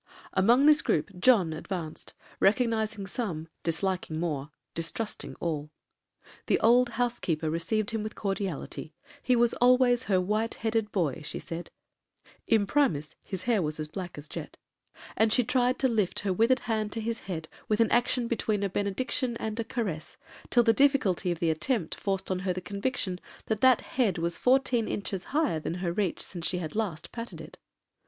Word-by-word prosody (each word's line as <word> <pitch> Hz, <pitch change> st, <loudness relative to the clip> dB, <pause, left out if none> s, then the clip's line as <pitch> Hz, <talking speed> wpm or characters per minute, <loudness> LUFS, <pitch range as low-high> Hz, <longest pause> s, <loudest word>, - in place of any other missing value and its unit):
Among 235 Hz, +8 st, +5 dB
this 305 Hz, 0 st, +7 dB
groupe 150 Hz, -, 0 dB
John 185 Hz, -6 st, +4 dB
advanced,—recognising 205 Hz, +6 st, -1 dB
some,—disliking 170 Hz, -3 st, -3 dB
more,—distrusting 165 Hz, +6 st, -4 dB
all. 150 Hz, -3 st, -3 dB, 0.8 s
The -, -, +3 dB
old 240 Hz, +2 st, +5 dB
housekeeper 170 Hz, -11 st, 0 dB
received 205 Hz, +7 st, -1 dB
him 225 Hz, -1 st, -1 dB
with 215 Hz, +1 st, -5 dB
cordiality;—he 195 Hz, -, -3 dB
was 235 Hz, 0 st, +3 dB
always 250 Hz, 0 st, +5 dB
her 190 Hz, -3 st, +3 dB
'white 215 Hz, +5 st, 0 dB
headed 225 Hz, -1 st, -1 dB
boy,' 165 Hz, -6 st, 0 dB
she 155 Hz, -, -5 dB
said,—(imprimis, 175 Hz, -, -2 dB
his 190 Hz, -2 st, -5 dB
hair 230 Hz, -5 st, +2 dB
was 155 Hz, -1 st, -2 dB
as 155 Hz, -, -2 dB
black 180 Hz, -1 st, -6 dB
as 145 Hz, +1 st, -8 dB
jet), -, -, -7 dB, 0.6 s
and 220 Hz, 0 st, +3 dB
she 250 Hz, -, +4 dB
tried 250 Hz, +1 st, +2 dB
to 265 Hz, -, +2 dB
lift 215 Hz, -6 st, +1 dB
her 195 Hz, -2 st, 0 dB
withered 230 Hz, +7 st, +3 dB
hand 215 Hz, -2 st, -1 dB
to 230 Hz, -, -3 dB
his 225 Hz, +1 st, -2 dB
head 160 Hz, -3 st, -4 dB, 0.2 s
with 215 Hz, 0 st, +2 dB
an 230 Hz, -, +3 dB
action 240 Hz, 0 st, +2 dB
between 215 Hz, -3 st, 0 dB
a 200 Hz, -, +1 dB
benediction 235 Hz, +5 st, -1 dB
and 220 Hz, 0 st, -4 dB
a -, -, +1 dB
caress, 210 Hz, -9 st, -4 dB, 0.3 s
till 240 Hz, -, +5 dB
the 225 Hz, -1 st, +5 dB
difficulty 265 Hz, -, +3 dB
of 170 Hz, -, -2 dB
the 165 Hz, -1 st, +1 dB
attempt 180 Hz, -, -1 dB
forced 195 Hz, -1 st, -1 dB
on 185 Hz, -, 0 dB
her 185 Hz, 0 st, -1 dB
the 180 Hz, -, -4 dB
conviction 200 Hz, 0 st, -2 dB, 0.3 s
that 220 Hz, -1 st, -2 dB
that 260 Hz, -2 st, +6 dB
head 225 Hz, -8 st, 0 dB
was 170 Hz, 0 st, -1 dB
fourteen 255 Hz, -3 st, +2 dB
inches 195 Hz, -2 st, -3 dB
higher 290 Hz, -, +1 dB
than 160 Hz, -, -3 dB
her 180 Hz, -1 st, -2 dB
reach 195 Hz, -2 st, -1 dB
since 175 Hz, -3 st, -4 dB
she 180 Hz, -, 0 dB
had 160 Hz, -1 st, -5 dB
last 185 Hz, -8 st, -3 dB
patted 235 Hz, 0 st, -7 dB
it. -, -, -11 dB
205 Hz, 165 wpm, -28 LUFS, 175-235 Hz, 0.8 s, this